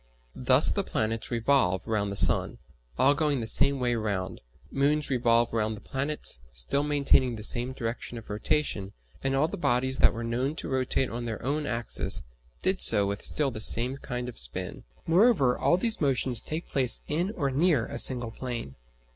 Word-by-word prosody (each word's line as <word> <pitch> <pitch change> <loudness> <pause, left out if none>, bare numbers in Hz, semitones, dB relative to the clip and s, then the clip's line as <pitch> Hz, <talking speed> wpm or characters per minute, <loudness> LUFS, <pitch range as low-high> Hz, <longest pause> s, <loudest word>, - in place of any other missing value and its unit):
Thus - - +2
the - - -2
planets 110 +1 -3
revolve 115 -6 0
round 105 -3 -2
the - - -6
sun, - - +4 0.4
all 135 +2 +3
going 145 -2 -1
the 115 - -5
same 140 +5 +5
way 125 -1 -1
round; 100 -5 -4 0.3
moons 145 +2 0
revolve 120 -2 +1
round 110 -1 -2
the - - -14
planets, 135 - -3
still - - -2
maintaining 140 -4 +1
the 105 - -9
same 120 +3 +2
direction 120 -1 -6
of 115 - -12
rotation, 105 -3 -3 0.3
and 135 0 -1
all 145 +3 +1
the - - -7
bodies 130 -2 -1
that - - +4
were 115 0 -7
known 125 +6 -3
to - - -7
rotate 130 0 -2
on 120 +1 -6
their 115 -2 -5
own 145 +2 -3
axis 115 -1 -2 0.4
did 190 0 0
so 105 -3 +6
with 100 +1 -4
still 145 -3 0
the 110 -2 -8
same 120 +4 +4
kind 125 -3 -6
of 125 - -9
spin. - - -5 0.2
Moreover, 165 - +2
all 175 - +1
these 225 +1 -1
motions 130 -4 +1
take 160 +2 -6
place 130 -3 +4
in 170 +6 -2
or 140 -5 -2
near 145 -3 +1
a - - -6
single 120 -3 +7
plane. 120 - -7
125 Hz, 185 wpm, -26 LUFS, 115-140 Hz, 0.4 s, single